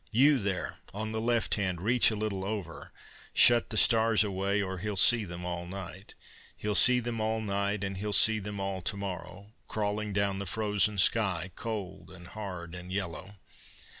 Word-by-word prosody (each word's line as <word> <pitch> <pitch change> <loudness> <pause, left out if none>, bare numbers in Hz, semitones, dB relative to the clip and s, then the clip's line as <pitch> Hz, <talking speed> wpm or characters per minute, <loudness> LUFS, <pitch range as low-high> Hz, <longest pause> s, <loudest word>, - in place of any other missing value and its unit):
You 135 +4 +4
there 95 -4 -3 0.2
on 110 +1 -4
the 110 0 -3
left 115 0 0
hand, 95 -4 -1
reach 120 +6 +3
a 110 - -3
little 105 -3 -3
over 95 -5 -6 0.4
Shut 120 -1 +5
the 110 - -3
stars 110 0 +5
away, 100 0 -1
or 95 -2 -3
he'll 105 +1 -4
see 110 +3 +6
them 90 -1 -8
all 85 0 -5
night: 95 +1 -8 0.4
He'll 105 0 -2
see 125 +6 +5
them 115 -2 -4
all 110 +1 -1
night 100 -1 -2
and 95 -1 -4
he'll 105 +2 -4
see 110 +2 +6
them 105 0 -6
all 95 -1 -3
to 100 +4 -3
morrow, 95 +1 -7
Crawling 105 0 -2
down 100 -1 0
the 100 - -5
frozen 105 0 0
sky, 95 -3 +2
cold 100 -4 -6
and 90 -1 -12
hard 90 -5 -7
and 90 0 -8
yellow. 95 +1 -5
100 Hz, 180 wpm, -29 LUFS, 95-110 Hz, 0.4 s, see